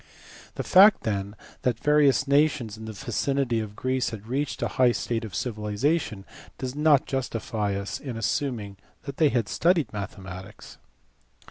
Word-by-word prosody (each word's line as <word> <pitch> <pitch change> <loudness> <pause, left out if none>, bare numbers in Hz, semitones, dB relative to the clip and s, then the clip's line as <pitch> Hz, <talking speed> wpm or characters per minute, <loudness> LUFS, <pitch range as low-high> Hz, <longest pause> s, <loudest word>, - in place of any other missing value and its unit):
The - - -3
fact 195 +3 +6
then 100 -1 -2 0.3
that 125 -3 0
various 145 -1 +3
nations 140 -6 +2
in 110 0 -9
the 110 - -6
vicinity 120 +3 -1
of 105 -2 -6
Greece 130 +2 -1
had 110 -2 -8
reached 135 +4 -2
a - - +1
high 125 -2 +3
state 115 -1 -2
of 105 -5 -7
civilization 110 - -1 0.3
does 130 -1 -4
not 150 -1 +4
justify 115 -6 -2
us 100 0 -4
in 130 -5 -6
assuming 110 -1 -2 0.3
that 140 - -7
they 155 -3 +4
had 120 -6 0
studied 170 - +1
mathematics. 95 -1 -8
120 Hz, 150 wpm, -26 LUFS, 105-140 Hz, 0.3 s, fact